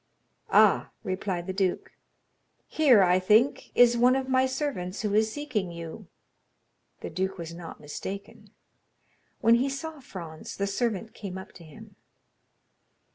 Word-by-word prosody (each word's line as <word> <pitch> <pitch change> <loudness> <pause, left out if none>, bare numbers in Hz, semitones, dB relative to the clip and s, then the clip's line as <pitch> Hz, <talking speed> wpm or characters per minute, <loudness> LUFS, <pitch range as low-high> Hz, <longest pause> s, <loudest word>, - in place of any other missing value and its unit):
"Ah," - - +5
replied 185 -2 -3
the 190 - -4
duke, 190 -2 -1 0.7
"here 260 -10 +5
I 180 0 +4
think, 215 +8 +3
is 240 -1 +6
one 245 +2 +4
of 265 -1 -1
my 260 0 +3
servants 260 -9 -3
who 210 -1 -1
is 220 +1 +3
seeking 220 -10 -3
you." 170 -1 -8 0.9
The - - -6
duke 190 +1 -2
was 170 -1 -7
not 170 -1 -9
mistaken; 190 +7 -8 0.9
when 230 0 +5
he 250 +4 +3
saw 310 +3 -6
Franz, 170 - -9
the 200 - 0
servant 220 +1 -2
came 195 -3 -7
up 190 - -9
to 175 - -14
him. 155 -3 -14
200 Hz, 140 wpm, -27 LUFS, 180-250 Hz, 0.9 s, is